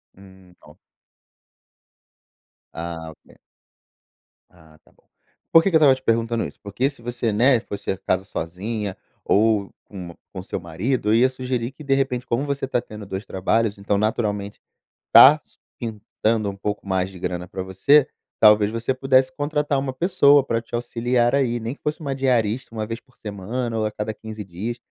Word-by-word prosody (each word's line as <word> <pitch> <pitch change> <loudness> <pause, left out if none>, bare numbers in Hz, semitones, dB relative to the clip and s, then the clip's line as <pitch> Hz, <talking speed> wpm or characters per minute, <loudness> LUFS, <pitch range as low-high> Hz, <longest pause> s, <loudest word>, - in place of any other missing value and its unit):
Hum, 95 -2 -18
ó 75 - -17 2.0
Ah, 80 -1 -6
ok. 75 - -21 1.1
Ah, 80 -3 -20
tá - - -26
bom. - - -32 0.5
Por 165 - +7
que 195 - +2
que 175 - -1
eu - - +7
estava 140 -4 +6
te 130 - -14
perguntando 115 0 +1
isso? - - -10
Porque 100 +7 -1
se 135 -4 -13
você, 120 -1 -2
né, 120 +4 +4
fosse 100 -3 -5
a 95 - -3
casa 95 0 -1
sozinha, 100 +3 -4 0.3
ou 105 -1 +2
com 95 -4 -9
um - - -16 0.2
com 95 -2 -6
seu - - -4
marido, 100 +8 -2
eu - - +4
ia 125 +3 +5
sugerir 125 -2 -3
que 150 +3 -13
de 135 -1 +1
repente 130 -2 0
como 125 +3 -1
você 140 -1 -2
tá 130 - +1
tendo 105 -3 -10
2 95 +1 -5
trabalhos 100 +3 0
então 100 0 0
naturalmente, 105 -1 -1 0.5
tá 150 +3 +10
su - - -27 0.2
pintando 110 -1 -2
um 100 - -6
pouco 105 +1 -4
mais 95 -1 0
de 95 - -12
grana 90 0 -4
pra 95 +1 -5
você, 130 +10 +4 0.3
talvez 105 -1 +6
você 115 +4 -1
pudesse 130 0 +3
contratar 145 0 -1
uma 135 -1 -3
pessoa 145 -4 +4
para 115 -3 -1
te 115 - -7
auxiliar 120 0 0
aí, 130 -4 +1
nem 115 +2 -4
que - - -18
fosse 150 +2 -3
uma 140 -3 -2
diarista 125 -3 0
1 110 -1 -2
vez 115 +2 -5
por 130 -2 -31
semana 115 +4 -4
ou 110 - 0
a 110 - -1
cada 105 +1 -4
15 110 0 -8
dias, 100 +7 -5
115 Hz, 185 wpm, -22 LUFS, 100-130 Hz, 2.0 s, tá